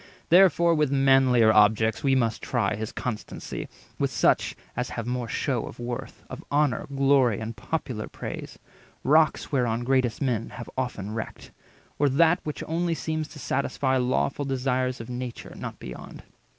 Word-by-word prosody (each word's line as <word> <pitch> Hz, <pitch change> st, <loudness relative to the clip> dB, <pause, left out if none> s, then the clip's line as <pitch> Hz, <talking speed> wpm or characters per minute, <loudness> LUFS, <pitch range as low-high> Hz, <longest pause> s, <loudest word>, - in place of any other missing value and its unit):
Therefore 170 Hz, -1 st, +6 dB
with 150 Hz, -4 st, +1 dB
manlier 135 Hz, -4 st, +5 dB
objects 110 Hz, +1 st, +4 dB
we 135 Hz, -1 st, +3 dB
must 115 Hz, -4 st, 0 dB
try 115 Hz, -6 st, 0 dB
His 110 Hz, 0 st, -4 dB
constancy—with 120 Hz, -4 st, -5 dB
such -, -, +2 dB, 0.2 s
as 125 Hz, +1 st, -2 dB
have 115 Hz, -, -4 dB
more 125 Hz, -1 st, -2 dB
shew 120 Hz, +1 st, -1 dB
Of -, -, -10 dB
worth, 120 Hz, 0 st, -6 dB
of -, -, -8 dB
honour, 145 Hz, -4 st, +1 dB
glory, 135 Hz, -5 st, +3 dB
and 110 Hz, +1 st, -5 dB
popular 115 Hz, -1 st, -4 dB
praise -, -, -7 dB, 0.5 s
(Rocks 155 Hz, +3 st, +3 dB
whereon 120 Hz, -4 st, +1 dB
greatest 130 Hz, -2 st, +1 dB
men 120 Hz, -6 st, -1 dB
have 120 Hz, -, -7 dB
oftest 125 Hz, -6 st, -3 dB
wrecked); 110 Hz, +1 st, -6 dB, 0.5 s
Or 145 Hz, 0 st, +4 dB
that 165 Hz, +6 st, +4 dB
which 150 Hz, -, -5 dB
only 170 Hz, +1 st, 0 dB
seems 155 Hz, +2 st, -3 dB
to 155 Hz, -, -13 dB
satisfy 130 Hz, 0 st, 0 dB
Lawful 130 Hz, +3 st, 0 dB
desires 130 Hz, -1 st, -1 dB
of 115 Hz, -, -9 dB
nature, 125 Hz, -1 st, -6 dB
not -, -, -6 dB
beyond. 60 Hz, -1 st, -9 dB
130 Hz, 150 wpm, -26 LUFS, 115-140 Hz, 0.5 s, Therefore